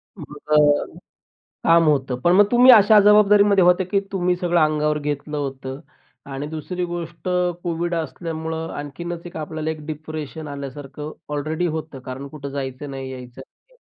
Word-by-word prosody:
तुमचं 150 -3 +1 0.7
काम 165 0 +5
होतं 135 -4 0
पण 175 - +3
मग 205 - +7
तुम्ही 250 +1 +7
अशा 215 -1 +7
जबाबदारीमध्ये 205 -1 +5
होते 180 +1 +4
की 195 +2 0
तुम्ही 180 -1 +1
सगळं 175 -1 +1
अंगावर 150 -1 +1
घेतलं 150 +1 -4
होतं 135 -1 -5 0.5
आणि 135 +2 -4
दुसरी 160 +4 -4
गोष्ट 175 0 -6 0.3
कोविड 175 0 -2
असल्यामुळं 160 +1 -4
आणखीनच 170 +4 -6
एक 175 - -10
आपल्याला 155 0 -4
एक 155 -1 -7
डिप्रेशन 155 0 -6
आल्यासारखं 140 +1 -7 0.2
ऑलरेडी 155 +4 -1
होतं, 155 -3 -5
कारण 130 +2 -7
कुठं 140 -1 -8
जायचं 135 0 -5
नाही, 135 -1 -6
यायचं 125 0 -10
नाही - - -19
155 Hz, 145 wpm, -22 LUFS, 145-175 Hz, 0.7 s, मग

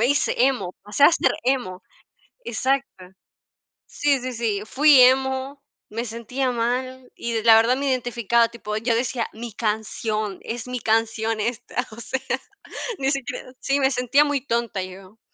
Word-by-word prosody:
me 235 - +4
hice 285 0 +1
emo, 245 -10 -2
o 205 - -14
sea, 285 +10 +6
ser 270 -6 +2
emo 245 -8 -1 0.6
exacto. 260 -4 -2 0.8
Sí, 285 -2 +1
sí, 255 +1 -4
sí, 220 -3 -1
fui 280 +1 +6
emo, 265 +2 +3 0.3
me 230 +3 -4
sentía 245 +3 -2
mal, 250 +2 -2
y 230 -2 -3
la 225 -1 +8
verdad 230 +3 +4
me 280 - -2
identificaba, 235 -2 +2
tipo, 210 -3 -6
yo 230 +1 0
decía: 240 0 -1
"Mi 230 0 -8
canción. 215 -2 -2
Es 235 +1 -6
mi 250 -1 -3
canción 225 0 0
esta". 240 +2 -2
O 215 - -11
sea, 265 - -3 0.8
ni 270 0 +1
siquiera 275 -2 -4
sí, 280 +1 0
me 265 0 +3
sentía 250 +3 +3
muy 290 -2 0
tonta, 235 -5 -1
yo. 190 +3 -12
240 Hz, 155 wpm, -23 LUFS, 225-265 Hz, 0.8 s, la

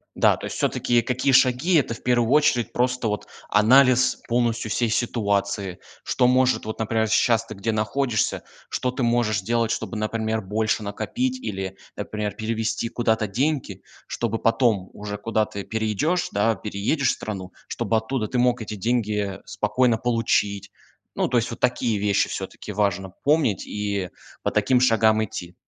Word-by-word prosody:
Да, - - +4
то - - -10
есть - - -5
всё-таки 120 -1 +1
какие 130 +3 0
шаги- 130 +8 +4
это, 130 -6 +2
в - - -14
первую 120 -1 +2
очередь, 145 -5 +3
просто 125 -2 0
вот 105 -1 -3 0.2
анализ 130 +4 +5
полностью 115 -2 0
всей 120 +1 0
ситуации. 100 -5 -1 0.3
Что 125 - +2
может 130 -2 +2
вот, 110 - -5
например, 110 0 0
щас 115 +1 +2
ты 110 - -8
где 105 +3 -2
находишься- 110 +2 0 0.3
что 125 - -1
ты 130 +1 -4
можешь 120 -3 +2
сделать, 115 +3 0
чтобы, 115 - -3
например, 110 +1 -1
больше 110 +2 -1
накопить 250 - -2
или, 95 - -5 0.2
например, 105 -2 -3
перевести 115 +1 -2
куда-то 110 -2 +1
деньги, 120 -3 -2 0.2
чтобы 115 -1 -2
потом 115 -5 +1
уже 105 0 -6
куда-ты 105 -2 -2
перейдешь, 110 - 0
да, 110 +3 +2
переедешь 110 +8 -1
в - - +4
страну, 95 -4 -6
чтобы 115 - -1
оттуда 110 +1 -1
ты 125 - -3
мог 125 -1 +2
эти 105 -1 -5
деньги 105 -2 -1
спокойно 115 +2 +1
получить. 105 -4 0 0.4
Ну, - - 0
то 125 - +2
есть 115 - -1
вот 115 - -8
такие 120 -3 +1
вещи 100 -1 +1
всё-таки 105 - -6
важно 95 -2 0
помнить 145 - +2
и 100 -3 -3 0.3
по - - 0
таким 125 -2 +2
шагам 110 -3 +4
идти. 90 -3 -7
110 Hz, 160 wpm, -24 LUFS, 105-125 Hz, 0.4 s, анализ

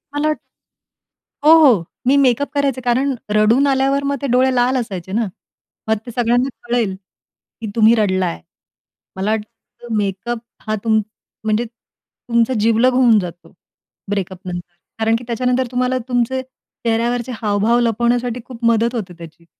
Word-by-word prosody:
मला 295 +1 +1
वाटतं 305 -5 -5 0.9
हो, - - +9 0.2
हो, 185 -6 -2 0.2
मी 270 - +5
मेकअप 275 0 +2
करायचे. 280 -3 0
कारण 255 +3 +1 0.2
रडून 225 +6 +4
आल्यावर 275 +1 +2
मग 280 0 0
ते 280 - -1
डोळे 255 +1 +3
लाल 250 +2 +2
असायचे 190 -7 -5
ना, 220 +2 0 0.6
मग 220 0 +2
ते 240 - -7
सगळ्यांना 245 +2 +1 0.2
कळेल, 235 -5 0 0.7
की 225 - -4
तुम्ही 225 0 +5
रडला 190 -4 +1
आहे. 80 - -4 0.7
मला 195 +3 -1
वाटतं, 220 +1 -6
मेकअप, 205 +4 -2 0.3
हां, 215 - 0
तुम 220 -1 +3 0.4
म्हणजे 220 +2 0
तुमचा 235 +1 -3
जिवलग 230 +4 +3
होऊन 245 -4 +5
जातो 175 -2 -8 0.6
ब्रेकअपनंतर. 180 -3 -4 0.3
कारण 225 0 +2
की 230 - -4
त्याच्यानंतर 250 +2 0
तुम्हाला 255 +1 0
तुमचे 250 +1 0
चेहऱ्यावरचे 240 -1 -3
हावभाव 215 +2 +2
लपवण्यासाठी 240 +1 0
खूप 245 -2 -11
मदत 230 +1 +2
होते 195 -6 -4
त्याची. 170 0 -13
235 Hz, 145 wpm, -19 LUFS, 215-250 Hz, 0.9 s, हो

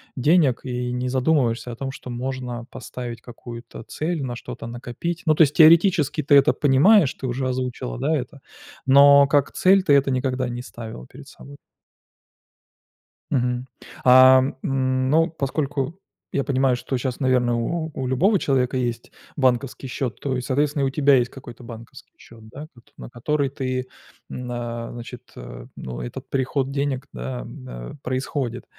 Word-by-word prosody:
денег 145 -1 +3
и 125 -1 -3
не 125 +1 -2
задумываешься 130 -3 +1
о - - -7
том, 135 +2 -5
что 130 - -10
можно 125 -1 -5
поставить 120 -1 -7
какую-то 120 -1 -10
цель, 155 +5 -3
на 125 -2 -4
что-то 120 -1 -8
накопить. 120 +9 -5
Ну, 155 -2 +3
то - - +2
есть 145 -1 +1
теоретически 160 -2 +5
ты 145 +1 +4
это 140 - +5
понимаешь, 150 +3 +4
ты - - 0
уже 130 +1 -2
озвучила, 125 - -3
да, 160 - +1
это, 135 +1 -7 0.5
но 140 +1 +7
как 145 -1 +2
цель 190 +1 +4
ты 150 - +3
это 140 -1 +4
никогда 130 -1 -1
не 120 0 -5
ставила 115 -2 -9
перед 135 +2 -14
собой. 140 0 -13 1.8
Мгм, 125 -2 -1 0.4
ам, 130 +1 +7
м, 130 -1 0
ну, 165 +4 +3
поскольку 145 +1 -3 0.3
я 140 - 0
понимаю, 130 -1 +1
что 130 +1 -3
щас, 125 0 -3
наверное, 125 -2 +2
у 160 +7 -2
у 130 -2 -4
любого 185 - +3
человека 130 -3 0
есть 120 -2 -3 0.2
банковский 130 -1 0
счёт, 125 -1 -4
то 135 -2 -2
и, - - -3
соответственно, 145 +2 0
у - - +1
тебя 140 0 +4
есть 125 -1 +2
какой-то 125 -2 -12
банковский 115 -1 -12
счёт, 115 -1 -16
да, 145 +6 -9 0.3
на - - -9
который 140 +4 -1
ты, 130 -1 -3 0.4
а, 120 -1 -5
значит, 120 0 -9
э, - - -10
ну, 60 -2 -7
этот - - -8
приход 135 0 -1
денег, 140 -2 -2
да, 60 0 -5
н - - -9
происходит. 130 -1 -3
130 Hz, 160 wpm, -23 LUFS, 120-140 Hz, 1.8 s, но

